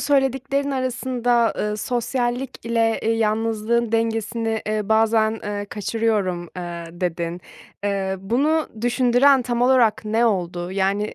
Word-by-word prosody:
söylediklerin 275 Hz, 0 st, +1 dB
arasında, 245 Hz, -2 st, 0 dB
ııı, 210 Hz, 0 st, -1 dB
"Sosyallikle, 240 Hz, -1 st, -1 dB
eee, 225 Hz, -, +1 dB
yalnızlığın 225 Hz, +1 st, 0 dB
dengesini, 225 Hz, 0 st, -1 dB
ııı, 215 Hz, -1 st, -1 dB
bazen, 220 Hz, 0 st, +2 dB
eee, 205 Hz, 0 st, -3 dB
kaçırıyorum." 205 Hz, -4 st, -1 dB
eee, 175 Hz, -1 st, -6 dB
dedin. 175 Hz, -1 st, -2 dB, 0.4 s
Eee, 195 Hz, -1 st, -1 dB
bunu 280 Hz, +11 st, +1 dB
düşündüren 245 Hz, +3 st, +4 dB
tam 240 Hz, 0 st, -1 dB
olarak 245 Hz, -4 st, +3 dB
ne 225 Hz, +3 st, +2 dB
oldu? 180 Hz, -3 st, -2 dB
Yani 200 Hz, +2 st, 0 dB
225 Hz, 115 wpm, -22 LUFS, 205-245 Hz, 0.4 s, düşündüren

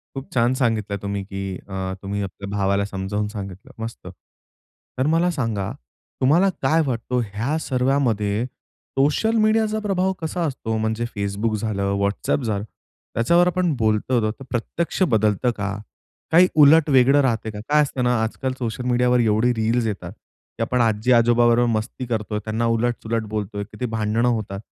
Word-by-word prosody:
खूप 135 Hz, 0 st, -8 dB
छान 120 Hz, +1 st, +3 dB
सांगितलं 110 Hz, -6 st, 0 dB
तुम्ही, 100 Hz, -1 st, -3 dB
की 95 Hz, -1 st, -5 dB
अ, 95 Hz, -1 st, -4 dB
तुम्ही 100 Hz, +1 st, -3 dB
आपल्या 100 Hz, +1 st, -7 dB
भावाला 100 Hz, 0 st, +1 dB
समजावून 100 Hz, +1 st, -3 dB
सांगितलं, 100 Hz, -2 st, -8 dB
मस्त. 115 Hz, +1 st, -7 dB, 0.9 s
तर 130 Hz, -, +1 dB
मला 170 Hz, +2 st, +3 dB
सांगा 115 Hz, -, -2 dB, 0.5 s
तुम्हाला 165 Hz, +9 st, +4 dB
काय 155 Hz, +5 st, +3 dB
वाटतो 125 Hz, 0 st, -1 dB
ह्या 115 Hz, +9 st, -2 dB
सर्वामध्ये 125 Hz, -6 st, 0 dB, 0.5 s
सोशल 150 Hz, +12 st, +2 dB
मीडियाचा 215 Hz, 0 st, +2 dB
प्रभाव 190 Hz, -3 st, 0 dB
कसा 165 Hz, +2 st, -3 dB
असतो 115 Hz, -6 st, -3 dB
म्हणजे 110 Hz, +1 st, -1 dB
Facebook 100 Hz, +2 st, -1 dB
झालं, 100 Hz, -2 st, -1 dB
WhatsApp 100 Hz, +6 st, 0 dB
झालं 105 Hz, -3 st, -1 dB, 0.5 s
त्याच्यावर 170 Hz, +10 st, +4 dB
आपण 180 Hz, -1 st, +1 dB
बोलतो 110 Hz, +1 st, +1 dB
तर 125 Hz, -, -11 dB
प्रत्यक्ष 165 Hz, +10 st, -3 dB
बदलतं 110 Hz, +1 st, +2 dB
का? 100 Hz, -1 st, -2 dB, 0.6 s
काही 175 Hz, +3 st, +7 dB
उलट 155 Hz, +2 st, +7 dB
वेगळं 135 Hz, +1 st, +5 dB
राहतंय 115 Hz, -4 st, 0 dB
का? 105 Hz, -, -7 dB
काय 150 Hz, +1 st, +5 dB
असतं 135 Hz, -3 st, -1 dB
ना 125 Hz, 0 st, +2 dB
आजकाल 130 Hz, +4 st, -2 dB
सोशल 120 Hz, 0 st, -3 dB
मीडियावर 125 Hz, 0 st, +3 dB
एवढी 110 Hz, +1 st, +3 dB
रील्स 115 Hz, +1 st, 0 dB
येतात, 95 Hz, -4 st, -4 dB
की 110 Hz, -, -16 dB
आपण 125 Hz, +2 st, +1 dB
आजी-आजोबा 120 Hz, +1 st, +3 dB
बरोबर 120 Hz, +1 st, +4 dB
मस्ती 115 Hz, +3 st, -3 dB
करतोय, 110 Hz, -3 st, -2 dB
त्यांना 110 Hz, +2 st, -1 dB
उलट-सुलट 115 Hz, -1 st, 0 dB
बोलतोय, 100 Hz, -1 st, -3 dB
किती 110 Hz, +5 st, -6 dB
भांडणं 110 Hz, +1 st, 0 dB
होतात. 105 Hz, -4 st, -2 dB
115 Hz, 155 wpm, -22 LUFS, 105-130 Hz, 0.9 s, काही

